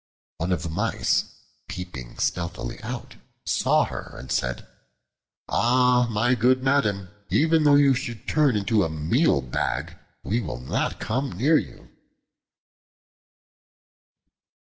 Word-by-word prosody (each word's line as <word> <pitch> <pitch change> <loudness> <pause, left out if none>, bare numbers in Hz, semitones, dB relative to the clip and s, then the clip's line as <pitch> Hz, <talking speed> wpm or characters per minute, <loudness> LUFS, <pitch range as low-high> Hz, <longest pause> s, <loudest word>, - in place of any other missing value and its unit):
One 85 +3 -1
of 90 -3 0
the 85 - -4
Mice, 105 +8 0 0.4
peeping 85 -10 -8
stealthily 85 -8 -3
out, - - -7 0.3
saw - - +2
her - - -8
and 65 - -9
said, 60 0 -2 0.8
"Ah, 125 +1 +3
my 115 +3 +2
good 130 +2 +2
madam, 105 -9 +1 0.2
even 160 0 +3
though 145 -1 +6
you 140 -1 +5
should 120 -3 -5
turn 150 -6 +3
into 105 0 +2
a 80 - -1
meal 80 - +2
bag, 60 - -3 0.3
we 115 +4 0
will 95 - -5
not 65 - -2
come 130 +3 -2
near 145 - +3
you." - - -11
115 Hz, 120 wpm, -24 LUFS, 85-130 Hz, 0.8 s, though